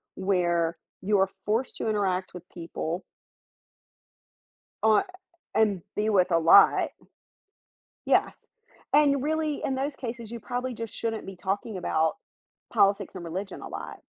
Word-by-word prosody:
where 175 -3 +1 0.2
you 205 +1 +2
are 195 0 +3 0.2
forced 225 +5 0
to - - -2
interact 190 -3 0
with 180 -2 -9
people 170 0 -4 1.8
uh, 220 -1 +5 0.5
and 205 -5 +2
be 210 +1 0
with 190 -4 +3
a 165 - +5
lot. 165 +4 +6 1.2
Yes, - - +1 0.5
and 285 -2 +5
really 310 -1 -1
in 265 - 0
those 275 +2 -2
cases, 235 -2 -6
you 235 - -5
probably 245 +3 -3
just 230 -1 -6
shouldn't 225 -1 -3
be 195 -1 -8
talking 195 +3 -3
about 160 -3 +1 0.6
politics 200 -2 +2
and 180 - -6
religion 190 +4 -5
a - - -7
lot, - - -7
205 Hz, 135 wpm, -27 LUFS, 185-230 Hz, 1.8 s, lot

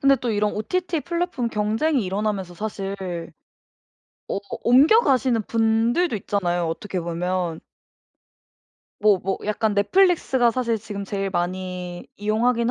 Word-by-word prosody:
근데 275 0 +5
또 245 -3 -3
이런 210 0 +1
OTT 330 - -1
플랫폼 340 -8 -2
경쟁이 225 +6 0
일어나면서 195 -1 -2
사실 200 0 -4 1.3
어 - - -1 0.2
옮겨가시는 260 - +4
분들도 230 - +2
있잖아요, 175 -4 -1
어떻게 185 +2 -3
보면. 175 0 -2 1.4
뭐 205 -2 +5
뭐 190 +2 -2
약간 210 0 0
넷플릭스가 265 - +3
사실 235 -1 -1
지금 205 -2 -6
제일 195 0 -3
많이 180 0 -3
이용하긴 230 +3 +1
215 Hz, 285 characters per minute, -23 LUFS, 190-245 Hz, 1.4 s, 근데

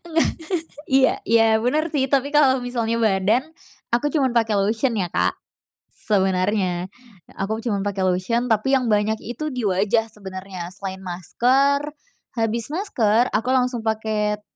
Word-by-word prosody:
Enggak 325 -1 +2 0.6
iya 265 0 +4
iya, 225 0 +4 0.2
benar 305 +7 +1
sih, 270 -2 +2
tapi 275 0 +1
kalau 270 -3 +4
misalnya 235 -2 -1
badan, 215 +2 +2 0.5
aku 245 +5 +2
cuman 270 -5 +2
pakai 225 -3 +2
lotion 220 +5 +1
ya 185 -3 0
Kak, - - +1 0.6
sebenarnya, 190 -2 0 0.5
aku 215 +3 -2
cuman 205 -5 -1
pakai 195 -1 -2
lotion, 210 +7 0
tapi 225 +5 +2
yang 255 - 0
banyak 210 +1 +1
itu 305 +7 -5
di 250 -2 -3
wajah 205 +4 +1
sebenarnya, 190 -3 -8
selain 190 -1 -6
masker. 270 - +1 0.5
Habis 225 +4 -1
masker, 245 - +1
aku 225 +4 0
langsung 250 -2 +1
pakai 215 -1 -1
225 Hz, 140 wpm, -22 LUFS, 200-255 Hz, 0.6 s, iya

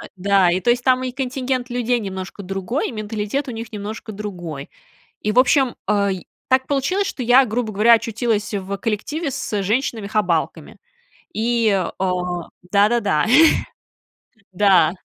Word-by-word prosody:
.Да, 195 -1 +3
и 185 - +1
то 240 - +3
есть 245 0 0
там 255 0 +3
и 255 - -3
контингент 255 -1 -3
людей 245 0 0
немножко 190 -1 -6
другой, 195 +7 -3
и - - -7
менталитет 215 +4 -3
у - - -4
них 230 -1 -7
немножко 215 +1 -6
другой, 175 -9 -7 0.5
и, 210 - 0
в 245 - +4
общем, 260 0 +3
ай, 200 -3 0 0.2
так 260 0 +3
получилось, 365 +9 0
что 255 - -4
я, 250 +3 +6
грубо 225 -1 -2
говоря, 220 +4 +5
очутилась 225 -1 0
в 200 0 -3
коллективе 270 - -3
с 205 -4 -3
женщинами-хабалками, 210 - -1 0.6
и, 230 0 +1
а, 190 -1 -1 0.6
да-да-да, 205 -5 +3 1.3
да. 185 -4 +4
215 Hz, 140 wpm, -20 LUFS, 200-245 Hz, 1.3 s, я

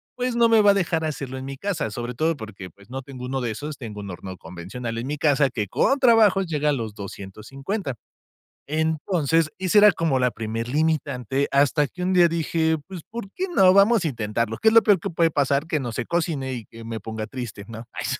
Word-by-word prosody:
pues, 250 -1 -2
no 235 -1 +5
me 225 -1 +5
va 205 -1 +6
a - - +4
dejar 170 -4 0
hacerlo 135 -4 -4
en 130 - -6
mi 135 0 -6
casa, 165 - -2
sobre 120 +3 -5
todo 160 +5 0
porque, 105 -5 -9
pues, 100 +5 -21
no 135 +1 -5
tengo 130 -1 -9
uno 130 +1 -2
de 120 -2 -2
esos, 145 +6 -6
tengo 110 -5 -8
un 100 - -7
horno 95 +1 -8
convencional 95 +9 -7
en 120 +3 -4
mi 150 +1 -3
casa, 140 -2 +3
que 105 -5 -3
con 275 - +2
trabajos 220 -6 +5
llega 150 -2 0
a - - +4
los 115 -6 -3
250. 125 - -6 0.7
Entonces, 160 0 +1
ese 190 +2 +3
era 210 0 +8
como 160 -6 0
la 125 -1 +2
primer 115 +1 -4
limitante, 140 -3 0
hasta 145 +1 +3
que 180 +4 -7
un 185 +1 +1
día 175 -1 +6
dije: 160 -1 0
"Pues, 185 -3 -8
¿por 225 -3 -6
qué 375 - -2
no?, 185 -1 +6
vamos 200 0 +5
a - - +2
intentarlo, 110 -2 -2
¿qué 220 - +1
es 220 - +6
lo 230 - +8
peor 200 -4 +4
que - - -4
puede 165 -1 +2
pasar? 140 0 +1
Que 155 -1 -1
no 125 -3 -4
se - - -3
cocine 160 -6 -1
y 120 -3 -6
que 115 0 -12
me 115 0 -5
ponga 110 +1 -5
triste", 110 -4 -7
¿no? 115 0 -8
Ay. - - -4
140 Hz, 230 wpm, -24 LUFS, 115-170 Hz, 0.7 s, era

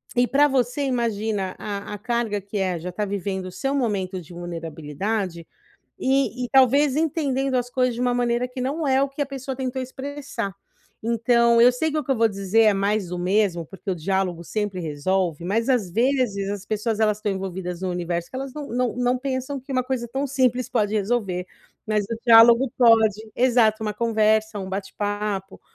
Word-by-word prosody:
e 245 0 +3
para 285 +3 +4
você 260 0 0
imagina 220 -6 -1
a 205 -1 -5
a - - -7
carga 235 -2 -1
que 200 +2 -6
é 185 -3 -1
já 175 +3 -5
está 180 +4 -3
vivendo 195 -1 -3
o - - -7
seu 270 +8 -2
momento 195 -8 -1
de 170 - -15
vulnerabilidade, 170 +2 -4 0.5
e 265 -2 +1
e - - -4
talvez 270 +1 +4
entendendo 275 -4 0
as 245 -1 -1
coisas 255 -1 +1
de 235 - -5
uma 245 -1 +2
maneira 240 0 +1
que 255 +1 -7
não 295 +4 -2
é 265 0 +3
o 280 - +1
que 275 - -9
a - - -2
pessoa 270 -1 -5
tentou 260 0 -3
expressar. 265 -5 -5 0.5
Então, 235 +1 +3
eu 245 +1 +8
sei 315 +6 -1
que 310 - 0
o - - -1
que 275 - -5
eu 265 - +3
vou 230 0 +4
dizer 200 +2 +2
é 210 -2 +5
mais 200 0 0
do 180 +1 -4
mesmo, 180 -1 +1
porque 190 +2 -7
o - - 0
diálogo 180 0 -1
sempre 205 0 -3
resolve, 170 +2 -1
mas 225 +7 0
às 235 -9 +1
vezes 230 -3 +1
as 205 -1 -5
pessoas 215 +1 -1
elas 210 -1 +2
estão 210 -1 -2
envolvidas 185 -2 -5
no 185 - -1
universo 175 -1 -3
que - - -7
elas 270 0 -5
não 300 -1 -6
não 245 0 -1
não 250 0 +1
pensam 260 +1 -3
que 270 +2 -8
uma 255 -1 +1
coisa 250 -2 -3
tão 270 +4 -2
simples 255 -2 +1
pode 215 -4 +1
resolver, 200 -4 -1 0.4
mas 215 -1 +1
o 230 +2 -4
diálogo 235 +2 +7
pode, 220 -3 +4
exato 235 -3 +3
uma 210 - -1
conversa, 220 -1 +1
um 190 -1 -5
bate-papo. 205 0 -3
220 Hz, 200 wpm, -23 LUFS, 195-255 Hz, 0.5 s, eu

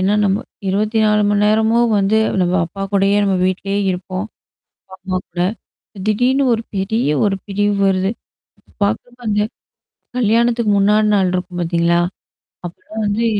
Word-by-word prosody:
ஏன்னா 195 +2 +2
நம்ம 195 0 +2 0.3
24 210 +1 +2
மணி 205 0 +2
நேரமும் 220 +2 +3
வந்து 200 +3 +2 0.2
நம்ம 180 0 +1
அப்பாகூடயே 195 +2 0
நம்ம 195 -1 +1
வீட்லயே 195 +2 -1
இருப்போம். 185 +2 -4 0.7
அம்மாகூட. 185 -2 -4 0.7
திடீர்னு 250 +6 +2
ஒரு 225 0 0
பெரிய 195 -1 0 0.2
ஒரு 195 -1 +1
பிரிவு 205 +1 0
வருது. 190 0 +1 0.7
பாக்கிறப்ப 235 +4 -3
அந்த 210 0 +1 0.8
கல்யாணத்துக்கு 230 -1 +2
முன்னாடி 210 +2 +3
நாள் 190 -2 +2
இருக்கும் 180 -1 -3
பாத்தீங்களா? 170 0 +1 0.7
அப்பலாம் 215 +5 -7
வந்து 220 +3 0
205 Hz, 120 wpm, -18 LUFS, 190-220 Hz, 0.8 s, நேரமும்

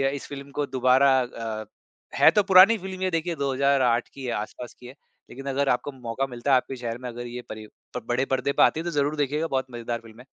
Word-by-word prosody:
इस 140 - -8
फ़िल्म 140 0 -8
को 145 +1 -2
दोबारा 130 +1 +3
अ, 115 -3 -5 0.5
है - - +7
तो 210 - +4
पुरानी 195 +3 +7
फ़िल्म 190 -1 -7
ये, 190 - +1
देखिए, 165 +1 -1
2008 135 -3 +1
की 135 - -10
है, 120 - -2
आसपास 110 +3 -6
की 125 - -14
है। 125 - -11 0.4
लेकिन 135 +2 -10
अगर 135 +1 0
आपको 125 +3 0
मौका 125 0 -3
मिलता, 125 +2 -1
आपके 130 +1 -1
शहर 120 -2 -5
में 125 0 -7
अगर 120 0 -7
ये 120 +1 -6
परि 110 0 -8 0.3
प - - -4
बड़े 125 +2 0
पर्दे 135 +1 0
पे - - +4
आती - - +3
है, - - -3
तो 175 - -3
ज़रूर 145 0 0
देखिएगा, 150 +2 -1
बहुत 130 -3 -1
मज़ेदार 120 0 -4
फ़िल्म 115 0 -15
है। 125 - -13
130 Hz, 235 wpm, -25 LUFS, 120-145 Hz, 0.5 s, है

